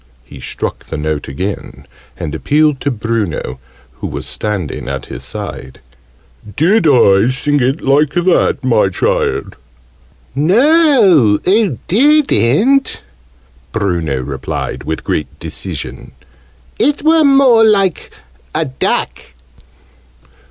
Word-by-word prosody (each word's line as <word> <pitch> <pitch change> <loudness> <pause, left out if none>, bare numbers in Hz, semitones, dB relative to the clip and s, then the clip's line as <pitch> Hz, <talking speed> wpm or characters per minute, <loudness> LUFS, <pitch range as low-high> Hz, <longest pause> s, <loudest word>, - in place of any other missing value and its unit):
He - - -13
struck - - -5
the - - -5
note 75 0 -3
again, 95 +9 -6 0.3
and 75 - -5
appealed 150 -2 +1
to 145 - 0
Bruno, 110 - -3 0.4
who - - -5
was - - -6
standing 100 -11 -4
at 70 -1 -5
his - - -8
side. 65 0 -8 0.8
"Did 175 - +3
I 115 -5 +4
sing 145 +3 0
it 135 +5 0
like 140 +2 +2
that, 175 -4 +1
my 115 -6 +2
child?" 90 - -1 0.8
"No, 195 - +4
oo 195 - +2
didn't," 265 - +2 0.7
Bruno 85 -10 -1
replied 65 0 -5
with 80 +1 -4
great 75 - -3
decision. - - -6 0.7
"It 290 +3 +1
were 320 0 +4
more 270 -5 +5
like 195 -5 +2 0.5
a 160 +1 0
duck." 130 -2 -2
135 Hz, 110 wpm, -15 LUFS, -, 0.8 s, more